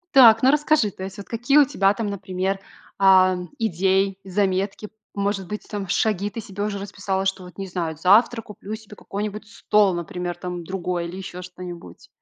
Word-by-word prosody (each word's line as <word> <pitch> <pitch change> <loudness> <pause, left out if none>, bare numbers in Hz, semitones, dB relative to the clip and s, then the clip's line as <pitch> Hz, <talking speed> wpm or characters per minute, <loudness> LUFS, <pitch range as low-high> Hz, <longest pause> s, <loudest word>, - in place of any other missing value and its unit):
Так, 230 -3 +8
ну, 260 - +7
расскажи, 295 -6 +3
то 190 - -9
есть 190 +1 -7
вот 200 - -9
какие 240 +5 +2
у 290 - +8
тебя 200 -8 +2
там, 215 0 -3
например, 190 -1 -2 0.4
а, 185 -1 +6 0.2
идеи, 195 -1 +1
заметки? 195 +1 -1 0.3
Может 200 -1 -1
быть, 210 +4 -6
там 200 -3 -4
шаги 205 +1 +1
ты 230 - -7
себе 205 -2 -5
уже 205 -1 -2
расписала, 195 -1 -3
что 195 -1 -1
вот, 180 +1 -13
не 195 -1 -5
знаю, 170 -3 -3
завтра 220 +7 +4
куплю 210 0 -8
себе 215 -1 -13
какой-нибудь 210 +2 -5
стол, 210 -3 +2
например, 175 +1 -4
там 180 -1 -5
другой 180 -1 -3
или 185 - -8
ещё 180 -1 -7
что-нибудь. 175 - -10
195 Hz, 180 wpm, -23 LUFS, 185-210 Hz, 0.4 s, Так